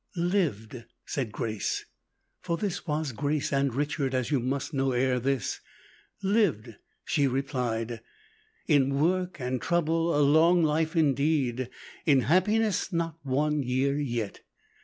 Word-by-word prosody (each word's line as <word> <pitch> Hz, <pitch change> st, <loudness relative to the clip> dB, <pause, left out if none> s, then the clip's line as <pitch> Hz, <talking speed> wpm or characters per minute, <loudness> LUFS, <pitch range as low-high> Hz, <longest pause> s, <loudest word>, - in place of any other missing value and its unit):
"Lived!" 150 Hz, -, -1 dB, 0.2 s
said 125 Hz, -6 st, -3 dB
Grace 110 Hz, -3 st, -3 dB, 0.6 s
for 170 Hz, -2 st, -2 dB
this 190 Hz, -2 st, -3 dB
was 150 Hz, -2 st, -1 dB
Grace 145 Hz, +4 st, -1 dB
and 140 Hz, -1 st, +2 dB
Richard, 140 Hz, -2 st, -1 dB
as 130 Hz, +2 st, -1 dB
you 140 Hz, -, +3 dB
must 135 Hz, +5 st, -2 dB
know 135 Hz, -1 st, +1 dB
ere 125 Hz, 0 st, +1 dB
this 130 Hz, -3 st, -1 dB, 0.6 s
"lived!" 190 Hz, -, +1 dB, 0.3 s
she 145 Hz, -2 st, +2 dB
replied; 125 Hz, -4 st, -2 dB, 0.6 s
"in 140 Hz, -3 st, +3 dB
work 180 Hz, +2 st, 0 dB
and 125 Hz, -1 st, -2 dB
trouble 165 Hz, -1 st, +1 dB
a -, -, +4 dB
long 160 Hz, +4 st, +5 dB
life 155 Hz, +2 st, +1 dB
indeed; 140 Hz, -5 st, +1 dB, 0.4 s
in 140 Hz, -4 st, +5 dB
happiness, 205 Hz, -, +2 dB
not 165 Hz, -2 st, -2 dB
one 145 Hz, +2 st, 0 dB
year 135 Hz, +2 st, 0 dB
yet. 120 Hz, -7 st, -3 dB
140 Hz, 130 wpm, -28 LUFS, 130-165 Hz, 0.6 s, long